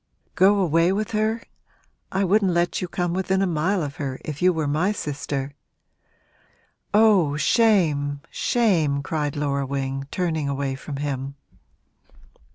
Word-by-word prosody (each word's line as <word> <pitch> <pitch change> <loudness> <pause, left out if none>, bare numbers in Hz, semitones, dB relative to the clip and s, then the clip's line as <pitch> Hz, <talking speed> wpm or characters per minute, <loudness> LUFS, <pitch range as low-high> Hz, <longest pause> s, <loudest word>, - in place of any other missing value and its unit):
'Go 195 +3 +4
away 165 -1 +3
with 210 +3 -2
her? 220 +1 0 0.7
I 190 +1 0
wouldn't 195 -1 +2
let 170 +1 0
you 180 - -2
come 175 0 -2
within 190 +1 0
a - - +3
mile 175 +2 0
of 140 -1 -6
her, 135 -3 -4
if 150 -2 -6
you 185 +1 +5
were 160 -4 -2
my 155 +8 +1
sister!' 145 -6 -4 1.4
'Oh, 200 -9 +4
shame, 155 - +2
shame!' 165 -12 +1
cried 150 -2 -2
Laura 140 -2 -1
Wing, 135 0 -3
turning 160 -5 -1
away 140 -1 -2
from 140 +2 -7
him. 140 -1 -4
160 Hz, 140 wpm, -23 LUFS, 140-190 Hz, 1.4 s, you